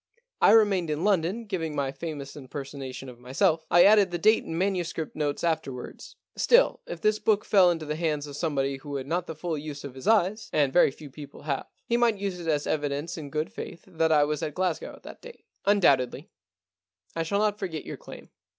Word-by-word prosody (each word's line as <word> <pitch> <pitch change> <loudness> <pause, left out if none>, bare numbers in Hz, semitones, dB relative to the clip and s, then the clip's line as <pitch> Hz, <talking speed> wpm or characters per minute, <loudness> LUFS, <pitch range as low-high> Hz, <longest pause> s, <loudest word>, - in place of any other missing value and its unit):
I - - +7
remained 200 -6 +4
in 150 +2 -2
London 200 +3 +1
giving 165 -7 -3
my 140 -2 -1
famous 140 -1 -7
impersonation 135 -1 -7
of 125 -2 -11
myself. 135 +6 +1
I 175 - +7
added 205 -2 +6
the 175 - -2
date 215 +6 +4
and 165 - -5
manuscript 175 -4 -2
notes 145 -2 -2
afterwards. 155 -7 -3 0.2
Still, - - +4
if 175 - -6
this 215 0 +2
book 210 -2 +1
fell 190 -3 +5
into 165 -2 -1
the 150 0 -3
hands 155 -3 -1
of 145 -1 -8
some 155 0 -2
body 135 0 0
who 140 +1 -7
had 135 -1 -3
not 175 +4 -2
the 160 - -6
full 165 +1 -3
use 145 -1 -7
of 140 - -7
his 130 0 -9
eyes 215 0 +2
— - - -45
and 140 -3 +2
very 175 - +6
few 140 +1 -12
people 145 0 -11
have 140 -3 -2
— - - -43
he 235 - +2
might 235 -3 +3
use 195 -2 -3
it 170 - -7
as 150 -2 +1
evidence 150 +3 -2
in 155 -5 -7
good 155 +2 -3
faith 170 - -8
that 165 -3 0
I 150 -2 +5
was 150 0 -1
at 150 - -4
Glasgow 185 -3 -2
at - - -19
that - - -11
date.* 485 -1 -13 0.2
* - - -40
Undoubtedly. 140 -12 +3 0.8
I 165 - -1
shall 165 +5 -1
not 210 0 +1
forget 165 -5 -4
your - - -6
claim. - - -12
160 Hz, 225 wpm, -27 LUFS, 145-185 Hz, 0.8 s, I